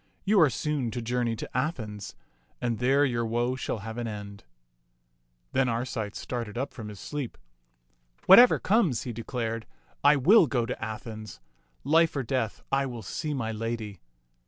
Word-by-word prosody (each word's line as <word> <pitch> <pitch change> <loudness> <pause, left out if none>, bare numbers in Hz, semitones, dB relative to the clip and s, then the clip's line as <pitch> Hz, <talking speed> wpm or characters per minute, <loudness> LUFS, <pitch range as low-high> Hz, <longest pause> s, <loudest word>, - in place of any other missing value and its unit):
You 200 -1 +5
are 155 - +6
soon 140 0 -1
to - - -2
journey 120 0 0
to - - -7
Athens, 115 - -3 0.4
and 120 -3 -1
there 135 +4 +4
your 120 -3 0
woe 120 +2 0
shall 130 - -3
have 115 +1 -5
an 120 - -3
end." 105 -1 -7 1.1
Then 130 -1 +2
Arcite 115 -3 -3
started 120 -3 -5
up 135 +3 -3
from 110 -5 -7
his 105 -2 -9
sleep. 145 0 -5 0.9
Whatever 235 +6 +9
comes," 190 - +2
he 120 - -5
declared, 115 -1 -4 0.4
"I 145 +1 +7
will 165 - +6
go 120 -4 0
to 115 - -5
Athens. 110 - -7 0.4
Life 165 +4 +3
or 135 - -1
death, 115 -3 -2
I 135 0 +2
will 120 -3 -7
see 150 - -3
my 115 -4 -2
lady." 110 -2 -4
120 Hz, 160 wpm, -28 LUFS, 110-140 Hz, 1.1 s, Whatever